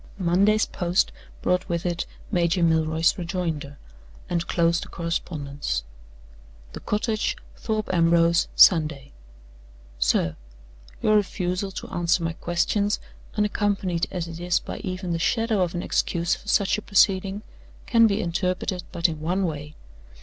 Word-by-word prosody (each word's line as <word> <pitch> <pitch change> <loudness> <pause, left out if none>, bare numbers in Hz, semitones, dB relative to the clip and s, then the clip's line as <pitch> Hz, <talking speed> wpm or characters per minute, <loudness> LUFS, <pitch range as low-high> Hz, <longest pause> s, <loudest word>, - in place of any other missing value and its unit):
Monday's 200 +4 +3
post 175 +1 0 0.3
brought 180 0 +1
with 170 0 -2
it 175 -1 -1 0.2
Major 175 -1 +2
Milroy's 160 +2 +2
rejoinder, 165 -5 -3 0.5
and 170 -1 -1
closed 170 0 +2
the - - -11
correspondence. 145 - -3 0.9
"The - - -6
Cottage, 215 +1 -1 0.2
Thorpe 215 -3 -2
Ambrose, 170 0 +4
Sunday. 155 -6 +5 0.9
"SIR 75 +6 +1 0.7
Your 215 - +4
refusal 185 -1 -1
to - - -6
answer 175 0 +1
my 165 0 -1
questions, 200 +5 0 0.4
unaccompanied 200 -4 0
as 175 -2 -4
it 165 0 -8
is 175 0 +1
by - - -7
even 185 -1 -4
the 165 - -1
shadow 225 +2 +1
of 180 -1 0
an 175 - -2
excuse 170 +1 0
for - - -7
such 200 0 +2
a - - -9
proceeding, 195 0 +2 0.4
can 230 -1 +5
be 205 +1 0
interpreted 180 +1 -2
but 170 -1 +2
in 160 -2 -5
one 180 +5 0
way. 150 -2 -5
175 Hz, 135 wpm, -25 LUFS, 165-195 Hz, 0.9 s, Sunday